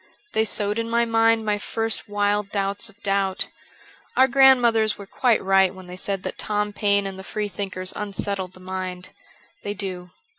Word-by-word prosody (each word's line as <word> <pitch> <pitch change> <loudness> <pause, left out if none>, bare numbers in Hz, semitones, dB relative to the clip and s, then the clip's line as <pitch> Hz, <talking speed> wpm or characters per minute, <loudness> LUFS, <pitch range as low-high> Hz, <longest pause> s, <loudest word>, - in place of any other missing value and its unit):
They 220 - +2
sowed 210 0 -1
in 230 0 -2
my 235 0 +2
mind 225 -1 +3
my 210 -1 +1
first 225 +1 -2
wild 205 0 +1
doubts 200 +1 -1
of 200 - -21
doubt. 195 -1 0 0.7
Our 260 - +7
grandmothers 245 -5 +5
were 200 - -9
quite 235 +3 +1
right 190 0 +4
when 185 -1 -11
they 180 0 -8
said 195 0 -2
that - - -5
Tom 210 0 -1
Paine 200 -1 +2
and 190 -1 -5
the - - -8
Freethinkers 195 -3 -3
unsettled 200 -2 -3
the 185 - -14
mind. 185 -1 -5 0.5
They 205 - -4
do. 185 -3 -5
205 Hz, 175 wpm, -23 LUFS, 190-220 Hz, 0.7 s, Our